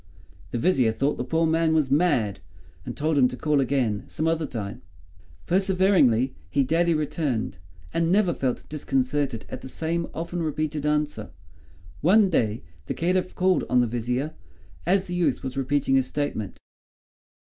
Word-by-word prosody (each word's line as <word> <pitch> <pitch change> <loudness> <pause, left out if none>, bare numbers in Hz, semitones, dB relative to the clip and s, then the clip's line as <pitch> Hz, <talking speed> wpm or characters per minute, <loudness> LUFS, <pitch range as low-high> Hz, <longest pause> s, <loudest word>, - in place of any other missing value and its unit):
The 120 - -3
Vizier 130 -5 +3
thought 135 +6 0
the - - -2
poor 160 +6 +1
man 160 0 +2
was 150 -4 +1
mad, 135 - +2 0.5
and 120 - -5
told 155 0 +1
him 125 - +6
to 125 - -7
call 150 0 +2
again 125 -6 0
some 155 - -2
other 165 -1 0
time. 105 -7 -6 0.6
Perseveringly 185 - +3 0.2
he 140 - +2
daily 165 +4 +2
returned, 145 - -2 0.3
and 165 0 +1
never 190 -3 +3
felt 130 -4 -2
disconcerted 135 -3 -1
at - - -7
the 130 - -9
same 165 +4 -2
often 170 +1 -4
repeated 155 -1 -2
answer. 150 -7 -1 0.7
One 195 +4 +5
day, 110 -7 0 0.2
the - - -3
Caliph 180 +2 0
called 185 0 +2
on 125 - +4
the 120 - +4
Vizier, 125 +6 -2 0.5
as 190 +1 +3
the 175 - -6
youth 165 -7 0
was 130 0 -4
repeating 135 0 0
his 135 -1 +3
statement. 135 -8 -3
150 Hz, 160 wpm, -25 LUFS, 125-165 Hz, 0.7 s, him